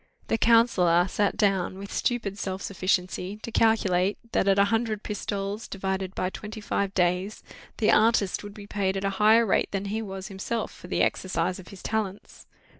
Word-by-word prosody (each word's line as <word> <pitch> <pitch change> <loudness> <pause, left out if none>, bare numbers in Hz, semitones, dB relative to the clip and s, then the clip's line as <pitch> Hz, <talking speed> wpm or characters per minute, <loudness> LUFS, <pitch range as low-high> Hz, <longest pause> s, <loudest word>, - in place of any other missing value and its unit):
The 225 - +2
counsellor 185 -7 +4
sat 205 +1 0
down, 195 -3 +1
with 200 +1 -8
stupid 210 -5 -1
self 190 -1 -4
sufficiency, 185 0 -1
to 230 - -5
calculate, 200 -4 +2
that - - +1
at 195 0 +4
a 200 - +5
hundred 225 -2 0
pistoles, 205 0 -4
divided 190 -1 -3
by 185 - -1
twenty 215 +2 -7
five 200 -2 -1
days, 180 +3 0 0.3
the 220 - +3
artist 215 -3 +3
would 205 0 -9
be 205 - -9
paid 195 -2 -1
at 195 - -2
a 195 - +1
higher 220 +2 +6
rate 200 - +1
than 195 0 -3
he 215 +3 -2
was 195 -3 -6
himself 205 +3 -3
for - - -12
the - - +1
exercise 180 0 -1
of 180 - -12
his 195 - -12
talents. 210 -3 -4
200 Hz, 185 wpm, -26 LUFS, 190-215 Hz, 0.3 s, higher